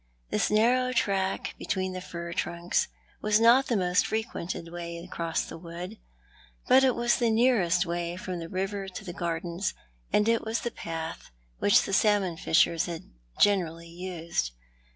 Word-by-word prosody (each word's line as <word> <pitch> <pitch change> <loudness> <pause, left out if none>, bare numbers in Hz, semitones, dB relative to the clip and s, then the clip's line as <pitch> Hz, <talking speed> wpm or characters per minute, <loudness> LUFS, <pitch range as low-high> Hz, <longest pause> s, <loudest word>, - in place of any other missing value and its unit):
This - - +1
narrow 245 +4 +3
track 195 -4 0
between 185 -1 -2
the 185 - -5
fir 170 -1 -6
trunks 170 +1 0 0.3
was 210 0 +3
not 240 +4 +6
the 235 - +1
most 180 -1 +2
frequented 220 -7 -3
way 170 -1 -5
across 170 -1 -2
the - - -9
wood; 175 +5 -8 0.7
but 260 +1 +6
it 260 -2 +4
was 240 0 +2
the 235 -2 +2
nearest 220 -7 +3
way 170 0 -2
from 185 -1 -5
the 165 0 -6
river 195 +2 -2
to 190 +1 -8
the 175 - -5
gardens, 170 +2 -2 0.4
and 210 - +3
it 230 0 +2
was 225 +1 -2
the 240 - -3
path 165 0 -6 0.3
which 205 - +5
the 195 - -4
salmon 200 -4 +3
fishers 165 +1 +3
had 170 +1 -7 0.3
generally 170 -5 +2
used. 170 - -3
185 Hz, 160 wpm, -28 LUFS, 170-215 Hz, 0.7 s, not